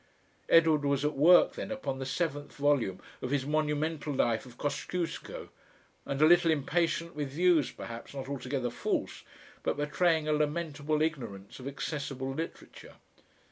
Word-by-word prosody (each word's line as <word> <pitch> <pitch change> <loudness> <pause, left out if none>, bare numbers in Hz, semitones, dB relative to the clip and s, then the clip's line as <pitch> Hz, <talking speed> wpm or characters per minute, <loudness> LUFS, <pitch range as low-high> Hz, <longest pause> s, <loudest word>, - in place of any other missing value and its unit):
Edward 160 -3 +5
was 140 0 +1
at 150 0 0
work 165 +6 +6
then - - -5
upon 140 - -3
the 135 - -4
seventh 145 -1 -2
volume 140 -10 +1 0.2
of 125 - -3
his 140 -1 0
monumental 150 0 -1
Life 120 -3 +1
of 125 -1 -14
Kosciusko, 170 +4 -4 0.6
and 140 - -2
a 155 - +7
little 175 +1 +6
impatient 170 +2 0
with 145 -2 -3
views 165 -1 +3
perhaps 115 +4 -8
not 135 -1 -5
altogether 130 -2 -3
false - - -2 0.4
but - - -1
betraying 155 +2 +1
a 155 - +2
lamentable 150 0 0
ignorance 120 -12 -4
of 130 - -7
accessible 135 -2 -4
literature. 165 +4 -7
145 Hz, 145 wpm, -30 LUFS, 135-160 Hz, 0.6 s, a